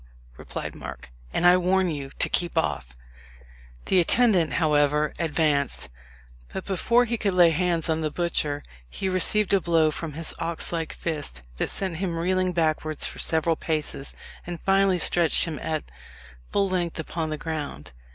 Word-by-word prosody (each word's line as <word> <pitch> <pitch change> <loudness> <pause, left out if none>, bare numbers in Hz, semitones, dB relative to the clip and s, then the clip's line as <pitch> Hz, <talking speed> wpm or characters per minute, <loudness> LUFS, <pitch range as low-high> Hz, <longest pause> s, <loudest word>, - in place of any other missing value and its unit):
replied - - -6
Mark; - - -9 0.2
"and 175 - 0
I 180 +1 +7
warn 185 +1 +2
you 145 -5 -4
to - - +3
keep 175 -2 -1
off." 65 -4 -1 0.9
The 190 - +3
attendant, 180 - +3
however, 150 -1 +2
advanced; 150 - 0 0.6
but 190 - -5
before 235 +6 +2
he 235 0 -2
could 200 -4 -1
lay 175 -2 +6
hands 170 0 +1
on 160 -1 0
the 155 - 0
butcher 150 -3 -1 0.3
he 190 - -4
received 190 +2 +3
a 195 - +4
blow 165 -3 +3
from 155 0 -6
his 160 +2 -2
ox 165 0 -1
like 165 -1 -2
fist 145 - -4
that - - -1
sent 185 -4 -1
him 175 -2 -2
reeling 185 +2 +1
backwards 155 -2 0
for - - -5
several 160 0 +2
paces, 155 -3 -3 0.3
and 175 -1 -5
finally 195 -1 +3
stretched 170 -1 +3
him 160 -3 -5
at 155 -1 -2 0.7
full 200 -1 +1
length 175 -3 -2
upon 160 0 -3
the 155 - -3
ground. 150 - -5
165 Hz, 160 wpm, -25 LUFS, 155-180 Hz, 0.9 s, I